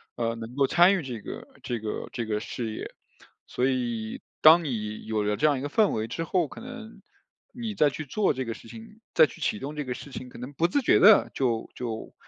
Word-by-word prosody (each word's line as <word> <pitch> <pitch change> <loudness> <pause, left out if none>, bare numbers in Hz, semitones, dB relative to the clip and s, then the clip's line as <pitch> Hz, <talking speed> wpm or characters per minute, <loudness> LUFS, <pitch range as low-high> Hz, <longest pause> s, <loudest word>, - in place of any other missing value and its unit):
呃， 115 -1 -1
能 115 +2 -8
够 140 0 +3
参 175 +6 +6
与 185 - -2
这 120 -5 -6
个 - - -8 0.2
这 120 -2 -3
个 110 0 -5
这 120 - -3
个 105 -1 -1
事 110 0 -5
业。 - - -6 0.6
所 125 - -1
以 120 -4 -2 0.2
当 165 +2 +8
你 110 -7 -4
有 110 -1 -1
了 105 0 0
这 150 - +1
样 145 -3 +2
一 - - -6
个 145 - -3
氛 210 +7 +3
围 110 0 -2
之 165 - -3
后， 170 -2 +1
可 - - -11
能 240 -2 -10 0.5
你 230 -4 -5
再 150 -5 +4
去 155 - -6
做 200 +9 +1
这 130 -1 -3
个 115 - -3
事 - - -14
情， 225 -1 -12
再 160 - +7
去 - - -13
启 105 - 0
动 145 +3 -6
这 150 - -2
个 125 -2 -3
事 135 +3 -10
情 130 0 -7
可 - - -12
能 125 +3 -7
不 165 +5 +2
自 280 +11 +1
觉 240 - +4
地 205 +2 +7
就 120 -4 0
就 115 -3 -5
130 Hz, 260 characters per minute, -27 LUFS, 115-175 Hz, 0.6 s, 当